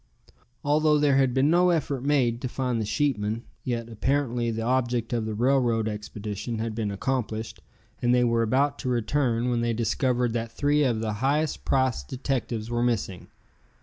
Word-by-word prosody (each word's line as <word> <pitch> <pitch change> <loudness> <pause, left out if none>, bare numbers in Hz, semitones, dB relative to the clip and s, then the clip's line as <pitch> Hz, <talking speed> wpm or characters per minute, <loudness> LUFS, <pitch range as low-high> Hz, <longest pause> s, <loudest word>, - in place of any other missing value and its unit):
Although 150 +1 +3
there 145 -2 +3
had 135 -2 +3
been 135 +4 +2
no 180 +1 +4
effort 145 -6 0
made 130 -5 +1
to 130 - -2
find 125 -2 -2
the 105 - -3
sheepmen, 115 -5 0 0.2
yet 115 -2 -2
apparently 120 0 0
the 115 0 -2
object 120 -1 0
of 115 -2 0
the 110 - -3
railroad 120 -2 +2
expedition 105 +1 -5
had 110 0 -3
been 110 -1 -2
accomplished, 110 +1 -3 0.4
and 120 - +2
they 125 0 +4
were 115 -1 +2
about 135 +5 +1
to 130 - -3
return 125 0 0
when 120 -1 0
they 120 0 0
discovered 120 +1 0
that 115 -1 -3
three 145 0 +2
of 120 -5 +1
the 110 -1 -2
highest 145 +3 0
priced 130 - +1
detectives 125 -4 -3
were 120 0 0
missing. 115 -6 -1
120 Hz, 175 wpm, -26 LUFS, 115-135 Hz, 0.4 s, no